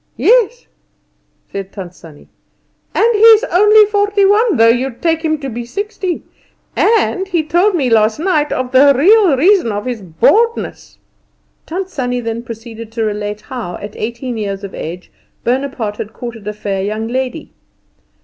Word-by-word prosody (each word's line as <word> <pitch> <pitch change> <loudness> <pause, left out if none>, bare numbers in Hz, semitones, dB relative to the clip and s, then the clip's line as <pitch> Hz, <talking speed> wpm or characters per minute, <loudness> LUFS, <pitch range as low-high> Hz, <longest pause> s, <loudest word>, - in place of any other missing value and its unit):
"Yes," 485 0 +2 0.9
said 195 -1 -6
Tant 185 -3 -8
Sannie; 160 -4 -16 0.7
"and - - +3
he's 445 +1 +6
only 420 0 +5
forty 410 -1 +1
one, 415 - +3
though 225 - +5
you'd 245 +1 0
take 325 -1 0
him 315 -1 0
to 280 -2 -6
be 240 -1 -5
sixty. 380 - -4 0.5
And 390 -4 +1
he 345 -4 0
told 350 +6 +2
me 280 -6 0
last 220 -2 +2
night 310 -4 +1
the 260 +2 +3
real 375 -1 +5
reason 355 - +3
of 205 0 -4
his 245 -4 -4
baldness." 420 - 0 0.7
Tant 365 +3 -4
Sannie 250 -4 -2
then 230 -1 -4
proceeded 230 -1 -9
to 225 -1 -2
relate 210 0 -3
how, 225 -8 -6
at 205 0 -9
eighteen 235 +2 -5
years 200 -1 -4
of 200 - -7
age, 175 +3 -7 0.3
Bonaparte 245 -4 -2
had 215 - -6
courted 230 -4 -8
a 210 - -3
fair 200 -2 -3
young 215 +3 -3
lady. 260 +5 -4
255 Hz, 155 wpm, -15 LUFS, -, 0.9 s, he's